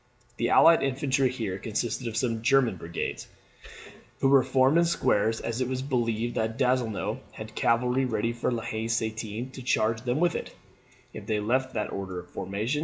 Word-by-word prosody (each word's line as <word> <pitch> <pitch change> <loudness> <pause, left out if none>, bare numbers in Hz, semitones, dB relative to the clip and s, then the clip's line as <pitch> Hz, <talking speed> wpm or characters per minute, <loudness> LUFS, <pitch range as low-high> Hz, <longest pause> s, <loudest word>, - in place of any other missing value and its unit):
The 120 - 0
allied 165 0 +6
infantry 135 -1 +1
here 110 -7 -4
consisted 115 +4 -2
of 110 -1 -4
some 115 -3 0
German 120 -4 +3
brigades, 85 0 -5 0.9
who 135 - +3
were 135 -1 +7
formed 130 +4 +3
in 170 - +4
squares, 110 -9 +1
as 115 +2 -3
it 130 - +1
was 130 0 -3
believed 120 -3 -1
that 110 +1 -2
Donzelot 125 -4 0
had 110 0 -9
cavalry 125 +4 +2
ready 115 -1 -1
behind 120 +1 -1
La 115 - -4
Haye 110 +1 -3
Sainte 115 +1 -3
to 130 - -8
charge 115 -2 +1
them 125 +3 -1
with, 175 0 +2 0.8
if - - -9
they 105 -1 0
left 130 +5 0
that 105 - -2
order 95 -2 -5
of 90 - -13
formation. 105 +9 -2
120 Hz, 180 wpm, -27 LUFS, 110-130 Hz, 0.9 s, were